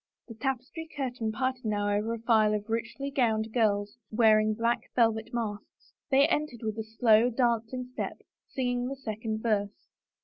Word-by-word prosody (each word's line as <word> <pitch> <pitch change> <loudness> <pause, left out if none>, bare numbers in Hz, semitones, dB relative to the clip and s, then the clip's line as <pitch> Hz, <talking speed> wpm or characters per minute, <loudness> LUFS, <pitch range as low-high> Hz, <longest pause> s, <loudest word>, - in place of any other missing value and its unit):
The 230 - -8
tapestry 270 +6 -4
curtain 245 -5 -2
parted 255 +3 -2
now 205 -2 0
over 220 +3 -1
a - - -8
file 220 -2 +3
of 210 +1 -5
richly 235 +5 -3
gowned 225 -5 +1
girls, 205 -1 +1
wearing 215 -1 +4
black 235 +2 0
velvet 225 -1 +2
masks. 220 -3 -5 0.2
They 275 +1 +5
en 305 -2 +1
tered 240 -5 -13
with 220 0 -3
a - - -2
slow, 225 +1 +4
dancing 240 0 0
step, - - -5 0.2
singing 245 -1 -1
the 275 - -4
second 220 -3 -4
verse. 210 -3 -1
230 Hz, 165 wpm, -29 LUFS, 215-250 Hz, 0.2 s, They